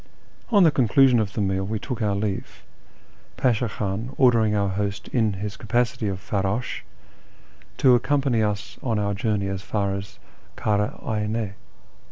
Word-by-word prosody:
On 205 -5 +5
the 160 - +6
conclusion 130 -1 +4
of 105 -2 -1
the 110 - -2
meal 95 -1 0
we 110 +3 -2
took 125 +2 -5
our 105 -2 +1
leave. 100 -1 -4 0.7
Pasha 120 -2 +1
Khan 105 +6 -4
ordering 115 -5 +4
our 100 -1 +1
host 100 +1 -3
in 110 -4 +1
his 100 +1 -5
capacity 115 -1 0
oi 95 - -2
farrdsh 100 +5 -2 1.0
to 130 - +5
accompany 135 -2 +2
us 105 -1 -2
on 115 -4 -1
our 100 -1 0
journey 100 0 -1
as 95 -1 -3
far 100 -1 -1
as 100 0 -6 0.4
Kara 105 -1 0
Ayne. 105 -1 -1
105 Hz, 155 wpm, -24 LUFS, 100-120 Hz, 1.0 s, the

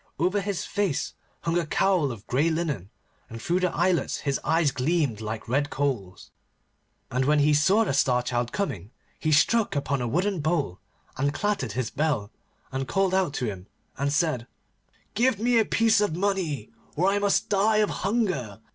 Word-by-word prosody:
Over 185 +4 +1
his 200 -2 -3
face 200 -9 -1 0.3
hung 165 +1 0
a 170 - -2
cowl 175 -5 +2
of 110 -4 -9
grey 145 +6 +1
linen, 150 - -2 0.4
and 115 - -8
through 175 +9 0
the 180 -2 +1
eyelets 180 -6 0
his 140 -2 -1
eyes 160 -2 +2
gleamed 135 -4 0
like 110 0 -5
red 140 +4 0
coals. 120 -11 -3 0.8
And 130 +1 +1
when 150 +2 +3
he 150 +1 +4
saw 190 +9 +4
the 190 - -1
Star 125 -2 +2
Child 120 -1 -1
coming, 105 - -3 0.3
he 155 - 0
struck 210 +7 +3
upon 140 -1 -1
a 120 - -1
wooden 185 - 0
bowl, 150 - -1 0.4
and 140 +2 +1
clattered 200 - -1
his 125 0 -2
bell, 145 -9 -1 0.4
and 135 0 -3
called 195 +1 +1
out 185 -6 +1
to 125 - -1
him, 100 -3 -5 0.3
and 140 +1 -1
said, 150 -6 0 0.7
'Give 235 +1 +2
me 235 +2 +3
a 220 - +3
piece 225 -1 +3
of 205 -6 0
money, 180 - -1 0.2
or 180 +5 +2
I 200 +1 +2
must 200 -1 +1
die 210 +2 +3
of 210 -1 +2
hunger. 180 - -1
155 Hz, 180 wpm, -26 LUFS, 130-195 Hz, 0.8 s, he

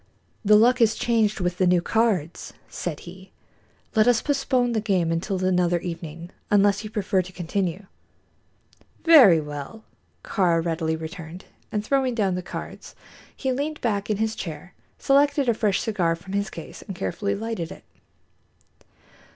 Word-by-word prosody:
"The 210 0 +6
luck 240 +4 +5
has 220 -2 +4
changed 220 -4 +1
with 180 0 -2
the 185 - +3
new 180 0 +4
cards," 190 -4 -1
said 160 -4 -5
he. 185 +2 -12 0.6
"Let 220 -1 +4
us 245 -2 +4
postpone 270 -4 +1
the 220 -2 0
game 185 -6 +1
until 185 +3 -2
another 180 -1 +2
evening, 170 0 -7 0.2
unless 205 0 +3
you 215 - -6
prefer 205 -2 0
to 185 +1 -10
continue." 185 +1 -3 1.2
"Very 260 - +8
well," 150 +8 -7 0.4
Kāra 175 -5 +1
readily 160 -1 -1
returned, 165 +2 -8 0.3
and 210 0 -2
throwing 265 -1 +1
down 200 -5 +1
the 180 - -2
cards, 180 - -8 0.4
he 265 - -1
leaned 295 +4 -3
back 205 -4 -1
in 210 - 0
his 220 +1 -1
chair, 165 -1 -7 0.2
selected 280 0 +2
a 235 - +4
fresh 210 -3 +1
cigar 180 -7 0
from 180 +3 -11
his 200 0 -1
case 165 - -10
and 195 - -8
carefully 200 +3 -2
lighted 220 -6 -4
it. - - -11
195 Hz, 155 wpm, -24 LUFS, 175-225 Hz, 1.2 s, Very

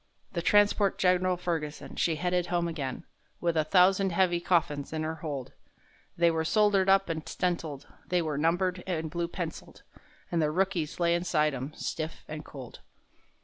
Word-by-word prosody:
The 170 - -2
transport 205 +1 +3
Gen'ral 185 0 +2
Ferguson, 165 -4 -4
she 165 - +1
headed 180 +2 0
home 175 -1 0
again, 145 -3 -4 0.3
With 170 -1 0
a 155 - +3
thousand 185 +3 +4
heavy 175 -1 +2
coffins 155 -5 0
in 155 0 -2
her 160 +1 -2
hold; 145 -5 -5 0.6
They 170 0 +4
were 160 0 0
soldered 200 +1 +3
up 195 0 +5
and 160 -2 -4
stenciled, 165 -6 -2 0.2
they 180 -1 +1
were 155 -2 -2
numbered 180 +4 +1
and 160 -4 -2
blue 170 0 -1
penciled,— 170 -2 -7 0.5
And 170 -2 +1
the 150 - +2
rookies 180 -2 -1
lay 170 -1 +3
inside 170 -4 +1
'em 135 +3 -5
stiff 160 0 -5
and 155 0 -6
cold. 130 -5 -10
170 Hz, 165 wpm, -29 LUFS, 155-180 Hz, 0.6 s, up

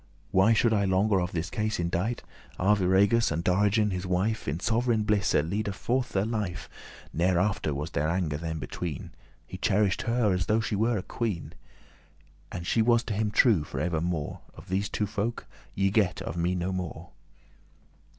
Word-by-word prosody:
Why 95 +5 +5
should 115 0 +3
I 100 -2 +2
longer 95 +1 +2
of 90 - -2
this 85 0 -3
case 110 -3 -1
indite? 90 +7 -1 0.4
Arviragus 100 +3 +3
and 80 +2 -1
Dorigen 105 +3 +2
his 90 0 -3
wife 95 +5 0
In 75 +4 -1
sov'reign 115 +1 +1
blisse 105 -2 +1
ledde 100 +6 0
forth 125 +5 -1
their 95 +1 +1
life; 105 -7 -3 0.5
Ne'er 90 +2 +2
after 95 -4 0
was 75 +2 -4
there 75 +2 0
anger 85 -4 -1
them 80 0 -4
between; 80 -2 -5 0.3
He 95 - -9
cherish'd 105 -2 +2
her 115 -4 +1
as 90 -2 -1
though 110 +1 +3
she 110 -1 -1
were 110 +3 +1
a 95 - -3
queen, 105 -8 -3 1.0
And 85 - -5
she 115 - +2
was 120 +1 +3
to - - -3
him 105 +1 0
true 105 - +4
for - - -6
evermore; 85 -2 -2 0.2
Of - - -13
these 95 +2 0
two 105 - -1
folk 105 +3 -3 0.3
ye 95 0 +2
get 100 -4 +2
of - - -5
me 85 +2 0
no 90 +1 -2
more. 90 -2 -5
95 Hz, 180 wpm, -28 LUFS, 90-110 Hz, 1.0 s, Why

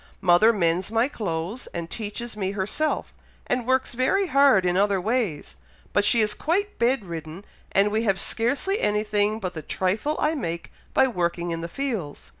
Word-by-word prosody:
Mother 190 +4 +5
mends 180 -3 +1
my 225 +3 +2
clothes, 195 - -4
and 170 -1 -3
teaches 220 +4 -5
me 195 -2 -2
herself, 210 +11 -2 0.3
and 250 -1 -1
works 260 -1 +1
very 260 +12 +2
hard 275 - +4
in 180 0 +2
other 200 0 +2
ways, 185 - -2 0.4
but 205 - +3
she 220 +2 +5
is 210 -1 +2
quite 400 - -1
bed 235 -2 +2
ridden, 165 +2 -7 0.3
and 200 +1 +3
we 220 +1 +1
have 195 -4 +1
scarcely 280 - 0
anything 210 0 +1
but 185 -4 -4
the 160 - -6
trifle 200 - -1
I 305 +1 +1
make 170 - -4 0.2
by 265 - +5
working 175 -5 -2
in 165 0 -3
the 170 - -4
fields. 220 - -4
210 Hz, 175 wpm, -25 LUFS, 180-245 Hz, 0.4 s, Mother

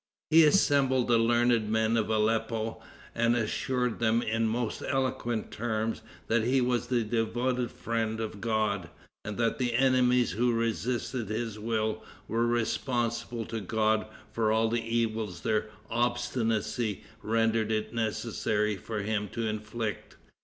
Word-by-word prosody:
He 165 +1 +8
assembled 140 -7 +3
the 115 -1 +5
learned 120 -1 +3
men 110 +1 +2
of 110 -1 +1
Aleppo, 110 +1 0 0.3
and 115 +1 +2
assured 125 +2 -1
them 115 0 +2
in 115 +1 0
most 115 0 -2
eloquent 130 -4 -1
terms 110 0 -2 0.2
that 115 0 +2
he 130 +3 +3
was 125 -1 0
the 120 -2 +1
devoted 120 +2 0
friend 115 -2 -2
of 110 -2 -5
God, 110 -6 0 0.3
and 105 -1 -5
that 115 +1 0
the 120 -2 0
enemies 125 -1 +3
who 120 +3 +1
resisted 115 +1 -1
his 110 -1 -3
will 110 0 -1 0.2
were 115 +2 +1
responsible 120 0 -1
to 115 - -4
God 110 +2 +1 0.2
for 110 -1 +1
all 110 +1 +2
the 115 0 0
evils 110 -5 -1
their 110 +2 0 0.2
obstinacy 115 -2 0 0.2
rendered 115 0 +1
it 110 +1 -1
necessary 110 -2 -1
for 105 +2 -4
him 105 -1 -1
to 115 0 -2
inflict. 110 +1 -4
115 Hz, 140 wpm, -29 LUFS, 110-120 Hz, 0.3 s, He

